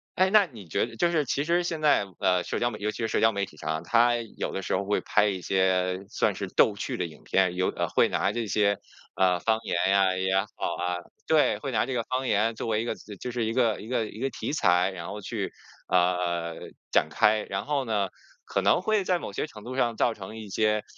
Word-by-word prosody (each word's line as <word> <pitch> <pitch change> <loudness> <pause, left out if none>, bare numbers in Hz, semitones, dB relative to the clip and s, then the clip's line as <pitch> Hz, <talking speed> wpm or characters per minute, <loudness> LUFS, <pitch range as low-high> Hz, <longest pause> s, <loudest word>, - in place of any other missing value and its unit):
哎， 185 0 +3
那 210 -2 +6
你 105 -7 -11
觉 - - 0
得 120 - -11
就 175 0 +2
是 155 -4 +1
其 140 +3 0
实 170 +2 +2
现 165 -3 -3
在 145 -9 +4
的 90 -1 +2
社 - - -3
交 120 - +1
媒 105 - -8
体 105 - -5
尤 105 - +1
其 - - -10
是 115 - -1
社 - - 0
交 115 0 +5
媒 100 -1 -1
体 75 -5 -17
上， 80 +2 -3
它 120 +4 +4
有 115 -2 -4
的 95 - -3
时 - - -1
候 100 +1 -1
会 105 - 0
拍 105 0 +2
一 95 -3 -2
些 95 0 +1
算 - - +1
是 - - -4
逗 105 - +3
趣 100 - -4
的 90 - -1
影 80 -2 -11
片， 95 -2 +2
有 90 0 +1
呃， - - -2
会 - - +3
拿 100 - +1
这 115 -1 -3
些， 100 0 +2 0.4
呃， 90 -2 +3
方 110 +2 +1
言 - - -1
呀 95 -1 +3
也 95 +1 0
好 - - -6 0.3
啊 90 0 -1 0.3
对， 155 -2 +3
会 135 -2 -4
拿 120 - +1
这 130 - -4
个 120 -2 0
方 130 +1 -2
言 110 +2 +2
作 115 - -5
为 110 0 +1
一 - - -3
个 115 - -2 0.2
就 125 - -4
是 120 -2 -1
一 110 - -1
个 115 -4 +2
一 110 - -9
个 115 -3 0
一 110 - -10
个 135 +1 0
题 145 - -4
材， 90 - +3
然 85 -2 -7
后 105 0 -6
去， - - -4 0.4
呃， 90 -2 +1 0.4
展 - - +3
开。 105 0 +3
然 95 - -4
后 140 -3 0
呢， 105 -4 0 0.4
可 - - -1
能 - - +3
会 215 0 +1
在 180 -1 +1
某 - - -7
些 - - -2
程 105 -7 -12
度 130 +1 -6
上 120 -3 +1
造 120 - +2
成 105 +2 -9
一 110 -2 -8
些 105 +1 +1
105 Hz, 275 characters per minute, -27 LUFS, 95-120 Hz, 0.4 s, 那